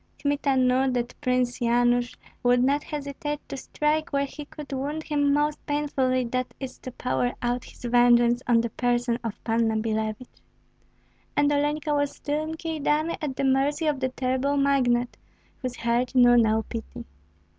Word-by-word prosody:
Kmita 285 -1 0
knew 260 +1 +3
that 245 -1 -2
Prince 250 -2 0
Yanush 240 +1 +2 0.3
would 245 0 +3
not 285 +3 +2
hesitate 295 0 -4
to - - -6
strike 300 +3 -1
where 280 0 +1
he 290 +2 -9
could 290 -1 -9
wound 290 +4 -3
him 290 -2 +1
most 295 +1 0
painfully, 270 -3 0
that 255 +1 -3
is, 265 -2 -7
to 255 - -8
pour 245 0 -1
out 245 0 -1
his - - -15
vengeance 240 0 +4
on 235 -2 +4
the 235 -1 -3
person 240 0 0
of 225 -3 -5
Panna 225 -1 +1
Billevich. 220 +2 -3 1.0
And 290 0 +4
Olenka 295 +1 0
was 285 -1 0
still 295 +1 -2
in 315 +1 -4
Kyedani 315 0 -1
at 285 -4 -3
the 275 - -2
mercy 275 +4 +2
of 295 -3 +1
the 260 0 0
terrible 260 +2 -1
magnate, 250 -3 +2 0.4
whose 255 -2 -4
heart 235 +2 -1
knew 245 -1 +7
no 220 -1 +3
pity. 230 +1 -7
260 Hz, 165 wpm, -26 LUFS, 245-290 Hz, 1.0 s, knew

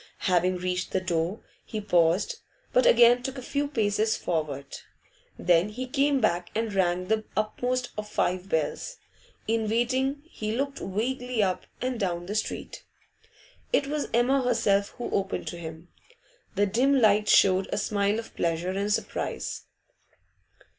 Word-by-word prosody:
Having 180 0 +2
reached 180 +1 -2
the 190 - +2
door, 180 +3 -1 0.2
he 215 - -5
paused, 180 - +2 0.4
but - - +5
again 245 - +6
took 265 +1 -5
a - - -5
few 285 +3 -1
paces 220 -4 +1
forward. 150 -5 -2 0.7
Then 175 +2 +3
he 250 +5 -5
came 275 +1 +2
back 175 -6 +1
and 225 -1 -1
rang 180 -1 +1
the 220 +2 0
uppermost 245 +4 -1
of 210 0 -6
five 185 -1 -1
bells. 160 - -2 0.5
In 220 -1 0
waiting, 260 +5 0
he 215 -8 -4
looked 275 +2 -2
vaguely 245 +4 -1
up 185 -2 -1 0.2
and 255 -2 -2
down 175 -3 -1
the 200 - -4
street. 215 - -4 0.9
It - - +3
was 295 +1 -2
Emma 250 +4 +3
herself 205 -5 +2
who 245 - -4
opened 195 0 -1
to 175 - -7
him. 165 +1 -9 0.7
The 205 +1 +3
dim 260 +7 +3
light 210 -2 +4
showed 190 -1 +5
a - - -1
smile 205 0 +1
of 230 - -7
pleasure 170 +2 -1
and 200 +2 -1
surprise. 210 - -3
210 Hz, 150 wpm, -27 LUFS, 185-250 Hz, 0.9 s, again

